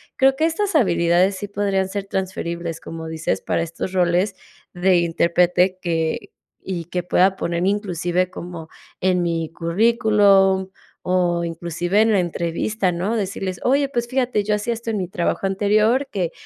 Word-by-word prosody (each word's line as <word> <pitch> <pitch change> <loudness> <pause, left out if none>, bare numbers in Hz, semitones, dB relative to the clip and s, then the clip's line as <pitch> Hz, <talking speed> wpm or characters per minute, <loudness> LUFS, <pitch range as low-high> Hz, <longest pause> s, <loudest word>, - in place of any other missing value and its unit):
creo 270 0 +4
que 315 - +1
estas 385 +4 -1
habilidades 180 - +3
sí 205 +2 -5
podrían 195 -1 0
ser 200 0 -4
transferibles, 170 -3 -4
como 165 0 -7
dices, 160 -12 -2
para - - -1
estos 170 +3 -5
roles 180 +2 +1 0.4
de 180 0 +3
intérprete 175 +2 +2
que 165 -2 -2 0.3
y 175 -4 -4
que 180 +1 -3
pueda 185 +2 +3
poner 170 +1 -1
inclusive 185 -3 0
como 170 -3 -8 0.3
en 180 -1 +2
mi 165 -2 -1
currículum 195 +1 +3 0.3
o 175 -2 +1
inclusive 175 +4 -1
en 225 0 +3
la 200 - +3
entrevista, 180 +4 -1
¿no? 185 +6 -2
Decirles: 195 -3 -3
"Oye, 275 +2 +2
pues 240 -3 -2
fíjate, 255 -5 0
yo 210 0 +1
hacía 220 +3 -2
esto 230 0 -6
en 215 - -1
mi 185 -2 -2
trabajo 180 +2 -1
anterior 215 +7 +2
que, 180 -4 -1
185 Hz, 155 wpm, -21 LUFS, 170-205 Hz, 0.4 s, creo